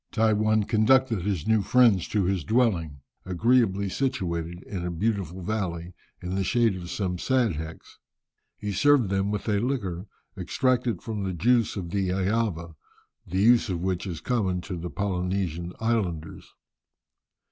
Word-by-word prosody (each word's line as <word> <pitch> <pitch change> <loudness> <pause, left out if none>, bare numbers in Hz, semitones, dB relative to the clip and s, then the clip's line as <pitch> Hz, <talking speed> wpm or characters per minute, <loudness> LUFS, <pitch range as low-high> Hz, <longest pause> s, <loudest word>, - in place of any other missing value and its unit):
Tai 110 -1 +3
One 110 0 +2
conducted 115 +1 +3
his 95 -4 -2
new 110 -1 +3
friends 110 -4 +4
to 105 -2 0
his 90 -2 0
dwelling, 85 - +1 0.2
agreeably 100 +1 +2
situated 85 -7 -2
in 95 -4 -5
a 90 - -2
beautiful 95 -1 -2
valley, 90 -4 -3 0.3
in 90 +1 -4
the 95 0 0
shade 115 0 +2
of 85 -1 -7
some 90 -2 -2
"sadhecks." 85 - -2 0.6
He 105 -1 -4
served 135 +1 +3
them 95 +1 +1
with 105 +1 -3
a 105 -2 +2
liquor 100 -7 -2 0.3
extracted 120 +5 0
from 110 -4 -4
the 95 -1 -2
juice 115 +6 +2
of 90 -4 -5
the 95 -1 0
"eava," 95 -3 -1 0.5
the 95 +3 0
use 120 0 +5
of 90 -3 -2
which 95 -1 -1
is 85 -4 -5
common 95 -8 0
to 90 +1 -6
the 85 +1 -5
Polynesian 90 -3 -2
islanders. 100 -9 -2
95 Hz, 150 wpm, -26 LUFS, 90-110 Hz, 0.6 s, use